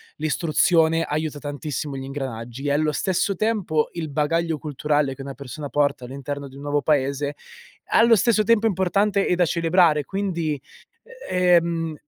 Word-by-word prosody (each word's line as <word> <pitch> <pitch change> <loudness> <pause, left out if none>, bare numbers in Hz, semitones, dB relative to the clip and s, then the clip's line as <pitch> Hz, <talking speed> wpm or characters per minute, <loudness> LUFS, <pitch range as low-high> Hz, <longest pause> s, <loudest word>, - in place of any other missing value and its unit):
l'istruzione 165 +1 +2
aiuta 155 -1 -3
tantissimo 145 0 -5
gli 135 - -5
ingranaggi 130 -2 -6
e - - +1
allo 150 +2 +2
stesso 190 +4 0
tempo 185 -7 0
il 165 -3 -4
bagaglio 160 +3 0
culturale 145 -1 -1
che 135 - -10
una 135 0 -6
persona 140 +1 -7
porta 140 -3 0
all'interno 140 +2 -6
di 135 - -14
un 140 - -10
nuovo 145 0 0
paese, 140 -1 0 0.6
allo 230 0 +6
stesso 215 +1 +3
tempo 225 0 +3
è - - +4
importante 200 +2 +1
e - - +2
da 175 0 +3
celebrare, 165 -2 +3
quindi, 170 -6 -2 0.7
ehm, 170 -3 +2
155 Hz, 155 wpm, -23 LUFS, 145-175 Hz, 0.7 s, allo